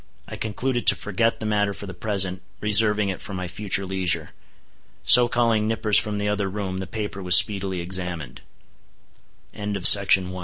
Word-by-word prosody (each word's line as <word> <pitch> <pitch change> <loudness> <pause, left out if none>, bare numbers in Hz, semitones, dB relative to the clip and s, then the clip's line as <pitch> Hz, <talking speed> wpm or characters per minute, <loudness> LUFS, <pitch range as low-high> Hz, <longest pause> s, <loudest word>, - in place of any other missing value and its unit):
I - - -9
concluded 120 +3 -5
to - - +7
forget 105 +3 -3
the 110 - -7
matter 105 -2 -2
for 100 - -10
the 95 - -10
present, 95 -1 -3 0.2
reserving 105 0 +1
it 95 - -7
for 100 - -9
my 90 -1 -6
future 100 +1 -4
leisure. 90 -4 -2 0.7
So 125 -1 +8
calling 115 -3 -1
Nippers 110 -2 +1
from 105 -1 -5
the 105 0 -4
other 105 -1 -3
room, 95 -2 -6
the 95 - -7
paper 105 -3 -7
was 90 -2 +8
speedily 95 -3 +3
examined. 90 -3 -7 1.1
A - - -19
few 105 0 -5
days 100 -1 +7
after 100 -1 +1
th 90 0 -9
100 Hz, 185 wpm, -21 LUFS, 95-105 Hz, 1.1 s, So